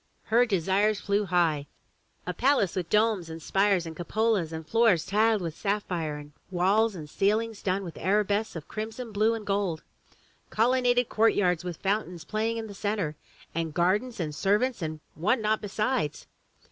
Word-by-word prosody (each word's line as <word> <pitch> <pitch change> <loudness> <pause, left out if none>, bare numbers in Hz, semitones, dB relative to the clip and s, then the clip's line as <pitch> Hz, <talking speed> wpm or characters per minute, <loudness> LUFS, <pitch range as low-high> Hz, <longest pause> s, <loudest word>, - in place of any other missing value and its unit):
her 240 +2 +3
desires 200 +2 +2
flew 205 +1 0
high 165 -6 +1 0.3
— - - -41
a 180 - -2
palace 245 - +2
with 175 -3 -3
domes 210 -5 +2
and 160 0 -7
spires 195 +2 +2
and 160 -1 -7
cupolas, 200 0 0
and 160 0 -6
floors 220 -7 +3
tiled 215 0 +2
with 165 -2 -4
sapphire, 180 -7 -2
and 145 0 -10 0.2
walls 195 +4 +2
and 155 -4 -7
ceil 200 +7 +2
ings 225 -2 -9
done 195 +1 0
with 170 -3 -8
arabesques 205 +3 +1
of 160 - -7
crimson, 225 +2 -5
blue 215 +2 +2
and 220 -2 -7
gold; 195 -5 -1 0.7
colonnaded 245 +1 +2
courtyards 185 -6 +2
with 175 -3 -5
fountains 190 -4 -2
playing 220 +5 -1
in 225 - -4
the 210 - -9
centre, 200 -6 -2 0.4
and 165 -2 -3
gardens 205 +8 +1
and 155 -3 -2
servants 210 - +1
and 155 -1 -4
what 180 +10 +1
not 215 0 +1
besides! 210 - -1
200 Hz, 170 wpm, -27 LUFS, 170-220 Hz, 0.7 s, her